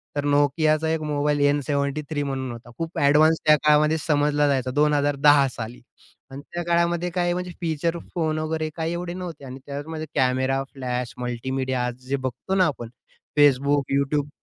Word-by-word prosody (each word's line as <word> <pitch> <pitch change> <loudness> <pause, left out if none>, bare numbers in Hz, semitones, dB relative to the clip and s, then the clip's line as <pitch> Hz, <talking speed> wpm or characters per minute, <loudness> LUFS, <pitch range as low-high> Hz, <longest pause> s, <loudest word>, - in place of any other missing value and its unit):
तर 145 0 -1
Nokiaचा 155 +2 +2
एक 160 - -2
mobile 150 -1 0
N 145 0 +3
73 145 +1 -1
म्हणून 130 -2 -3
होता, 120 0 -10
खूप 165 +1 -5
ॲडव्हान्स 155 +3 +5
त्या 150 0 +7
काळामध्ये 150 +1 +4
समजला 150 -1 +1
जायचा. 130 -2 0
2010 145 -1 +4
साली 115 +2 -7 0.5
आणि 135 - -7
त्या 175 0 -2
काळामध्ये 170 +1 +1
काय 175 0 0
म्हणजे 180 0 -4
फीचर 165 +1 -1 0.2
फोन 155 -2 0
वगैरे, 155 0 -2
काय 165 0 -2
एवढे 175 0 -4
नव्हते 175 -6 -7
आणि 130 +1 -8
त्याचमध्ये 155 +3 -5
कॅमेरा, 130 0 +1
फ्लॅश, 125 -1 -4
मल्टीमीडिया 125 +1 -2
जे 130 +2 -3
बघतो 130 +8 -3
ना, 185 - +4
आपण 120 -5 -5 0.5
Facebook, 140 0 +4
YouTube 140 +1 0
145 Hz, 160 wpm, -24 LUFS, 135-160 Hz, 0.5 s, त्या